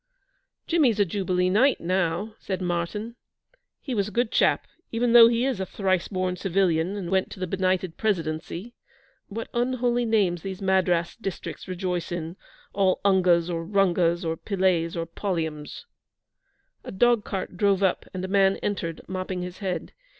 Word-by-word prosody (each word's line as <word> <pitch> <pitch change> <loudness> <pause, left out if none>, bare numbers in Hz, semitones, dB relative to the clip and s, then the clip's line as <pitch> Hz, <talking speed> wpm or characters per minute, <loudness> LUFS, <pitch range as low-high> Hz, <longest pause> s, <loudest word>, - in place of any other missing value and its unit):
'Jimmy's 275 -11 +2
a 205 - +5
Jubilee 185 -1 0
Knight 255 +7 +4
now,' 180 +3 -1
said 190 -2 -3
Martyn. 185 +6 -3 0.7
'He 265 - -4
was 200 -3 0
a - - -7
good 240 0 0
chap, - - +2 0.3
even 235 +1 +1
though 235 -1 +10
he 235 +1 +1
is 265 -7 -1
a 190 - -1
thrice 185 -3 0
born 185 -2 -1
civilian 180 -1 +1
and 180 -3 -5
went 190 -1 +1
to - - -10
the 185 - -1
Benighted 185 -1 -1
Presidency. 175 +1 -2 0.5
What 225 +2 -5
unholy 245 0 +1
names 200 -7 +1
these 190 +1 -6
Madras 185 -3 +1
districts 195 -4 -6
rejoice 180 -2 -3
in 170 0 -4 0.4
all 195 -2 +2
ungas 180 -3 +4
or 165 -2 -3
rungas 175 -2 +2
or 160 0 -1
pillays 185 -4 0
or 165 -1 -2
polliums.' 160 -5 -4 1.0
A - - -7
dog 235 +2 +3
cart 190 -2 -4
drove 200 0 +2
up, 190 - +1
and 185 0 -4
a - - -4
man 195 0 +3
entered, 170 -5 -3
mopping 185 -1 -3
his 180 0 -7
head. 190 -3 -4
190 Hz, 160 wpm, -25 LUFS, 175-205 Hz, 1.0 s, though